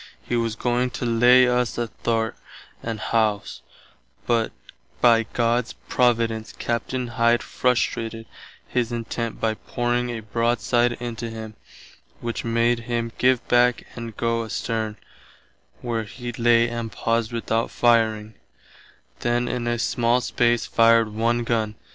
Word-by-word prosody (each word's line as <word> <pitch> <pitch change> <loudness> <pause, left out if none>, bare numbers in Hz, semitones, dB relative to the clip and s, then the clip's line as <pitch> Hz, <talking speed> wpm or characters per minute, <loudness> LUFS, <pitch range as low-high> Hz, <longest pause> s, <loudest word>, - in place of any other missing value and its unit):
He 120 - 0
was 115 -2 0
going 125 +1 0
to - - -3
lay 120 +2 +6
us 125 -1 0
athwart 115 -1 -1 0.5
the 115 -1 -3
hawse, 110 -1 -1 0.6
but 115 -2 +1 0.5
by 115 -2 +4
God's 120 0 +1 0.2
providence 115 -3 +1
Captain 120 +2 -2
Hide 120 0 +2
frustrated 115 -2 -1 0.4
his 120 -1 -1
intent 115 -1 -4
by 110 -1 +1
pouring 120 +2 -2
a 115 -2 -4
broadside 120 +2 +1
into 120 -1 -5
him, 110 -1 -7 0.7
which 115 -1 -4
made 115 +1 +2
him 115 -1 -1
give 125 -1 +2
back 120 0 +3
and 115 -3 -7
goe 115 0 0
asterne, 110 -1 -3 0.8
where 115 -2 -2
he 120 +3 -7
lay 120 0 +3
and 115 -1 -4
paused 115 0 -1
without 115 -1 -1
fireing, 110 -2 +2 0.9
then 120 +1 0
in 120 -1 -2
a 120 0 0
small 120 +1 +1
space 120 -1 +1
fired 115 -1 +4
one 115 +2 +1
gunn. 110 -2 -1
115 Hz, 130 wpm, -23 LUFS, 115-120 Hz, 0.9 s, lay